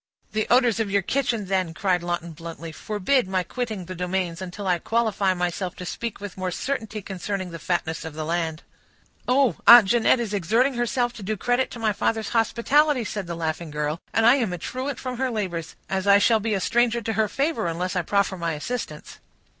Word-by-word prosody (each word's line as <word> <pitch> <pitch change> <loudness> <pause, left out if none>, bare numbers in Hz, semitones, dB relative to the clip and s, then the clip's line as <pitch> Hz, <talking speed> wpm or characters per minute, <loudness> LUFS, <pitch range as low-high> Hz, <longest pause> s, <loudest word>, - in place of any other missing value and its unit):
"The 215 0 -1
odors 240 -3 +4
of 220 -2 0
your 200 -1 +1
kitchen, 240 -3 0
then," 185 -3 -1
cried 185 -2 +1
Lawton 175 -1 -3
bluntly, 165 0 -8
"forbid 215 - 0
my 185 -1 0
quitting 220 -4 -4
the 185 - -6
domains, 180 -1 -2
until 185 +2 -6
I 180 -2 +2
qualify 210 -3 +1
myself 180 +1 -2
to 180 - -7
speak 230 +5 -4
with 205 -2 -8
more 185 0 -1
certainty 220 0 -3
concerning 190 -1 -4
the 165 - -7
fatness 165 0 -2
of 160 -2 -7
the 155 0 -4
land." 165 -1 -2 0.6
"Oh! 255 - +3
Aunt 235 -5 +10
Jeanette 240 +2 +4
is 225 -3 -3
exerting 225 +8 +2
herself 240 0 0
to - - -10
do 210 +2 -2
credit 245 +5 +1
to - - -8
my 220 -2 +1
father's 220 +1 -1
hospitality," 250 +4 +2
said 205 -3 -4
the 170 - -4
laughing 160 0 -3
girl, 150 +1 -2
"and 225 - +2
I 240 +4 +7
am 230 -8 0
a 180 - -3
truant 260 - -4
from 255 -1 -5
her 265 -1 +1
labors, 185 -8 -3
as 190 0 -2
I 200 0 +8
shall 220 +2 +4
be 215 0 -1
a - - 0
stranger 235 +4 +2
to 225 - -2
her 220 0 +2
favor, 280 - -1
unless 180 +3 -2
I 180 - +2
proffer 200 +2 0
my 170 -1 -2
assistance." 155 -1 -5
200 Hz, 210 wpm, -24 LUFS, 175-235 Hz, 0.6 s, Aunt